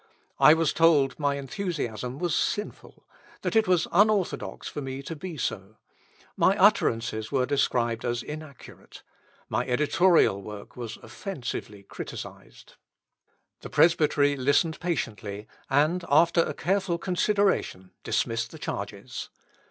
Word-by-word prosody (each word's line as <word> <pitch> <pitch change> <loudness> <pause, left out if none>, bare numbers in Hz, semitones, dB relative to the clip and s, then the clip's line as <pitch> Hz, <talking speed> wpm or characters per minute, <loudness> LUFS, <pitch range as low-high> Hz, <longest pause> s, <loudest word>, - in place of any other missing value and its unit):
I 155 - +8
was 165 -1 +1
told 155 -5 +3
my 145 -1 +1
enthusiasm 135 - -4
was 175 -1 -1
sinful, 210 - -3 0.4
that - - -2
it 220 -1 +4
was 180 -2 +2
unorthodox 205 0 +1
for 145 - -5
me 135 0 -6
to 165 - -6
be 170 +1 -7
so. 105 -4 -4 0.6
My - - +3
utterances 110 -1 +2
were 130 -3 +2
described 120 -4 0
as 120 -1 -2
inaccurate. 150 -3 -11 0.4
My 120 +3 0
editorial 150 - +3
work 105 0 -10
was 120 -3 -6
offensively 120 - -6
criticised. - - -10 0.8
The - - -9
Presbytery 150 -3 +3
listened 145 +5 +1
patiently, 105 - -3 0.2
and 155 +6 +2
after 170 +3 +5
a - - -2
careful 190 -1 0
consideration 185 - 0
dismissed 115 +1 -1
the - - -11
charges. - - -6
145 Hz, 120 wpm, -26 LUFS, 120-170 Hz, 0.8 s, I